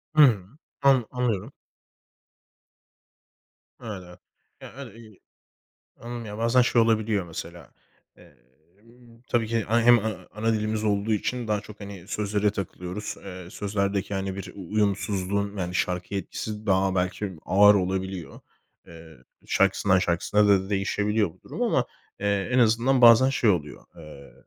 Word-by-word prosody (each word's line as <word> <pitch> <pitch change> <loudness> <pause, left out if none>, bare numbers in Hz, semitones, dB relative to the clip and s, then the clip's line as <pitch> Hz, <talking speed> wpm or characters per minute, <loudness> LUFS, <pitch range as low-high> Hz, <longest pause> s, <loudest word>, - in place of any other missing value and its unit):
Hımm, 120 -6 +4 0.2
an 135 -4 +4
anlıyorum. 125 -6 -2 2.3
Öyle. 90 -5 -8 0.4
Ya, - - -11
öyle 135 -6 -9
bi 110 -3 -15 0.8
Anladım, 120 0 -7
ya, 105 0 -7
bazen 115 +2 +3
şey 120 -1 +3
olabiliyor, 110 -3 +1
mesela. 85 +1 -9 0.4
Emm, 105 - -22
tabii 115 -2 +1
ki 115 -1 -1
a 115 +1 +3
hem 120 0 +6
a 110 +1 -2 0.2
ana 115 +2 0
dilimiz 110 0 -1
olduğu 105 +1 +1
için 120 +3 -2
daha 105 -1 0
çok, 105 0 -13
hani, 100 -3 -10
sözlere 105 0 0
takılıyoruz. 95 0 -5
Eee, 90 -2 -9
sözlerdeki, 100 -1 -2
hani, 95 -1 -3
bir 95 -2 -7
uyumsuzluğun, 100 0 -1
yani, 90 -1 -3
şarkıya 90 +3 -1
etkisi 105 +3 -6
daha 95 -1 +2
belki 95 +2 -2
ağır 105 +2 +6
olabiliyor. 95 -2 -3 0.5
Eee, 80 -2 -13 0.3
şarkısından 100 -1 +2
şarkısına 100 +4 +1
da 95 -1 +3
değişebiliyor 105 +1 0
bu - - -20
durum - - -7
ama, - - +2 0.3
eee, 100 +1 -1
en 125 - +3
azından 120 +3 +3
bazen 120 +2 +8
şey 120 -5 +2
oluyor. 75 -6 -2
Eee, 75 -4 -13
100 Hz, 135 wpm, -25 LUFS, 95-115 Hz, 2.3 s, bazen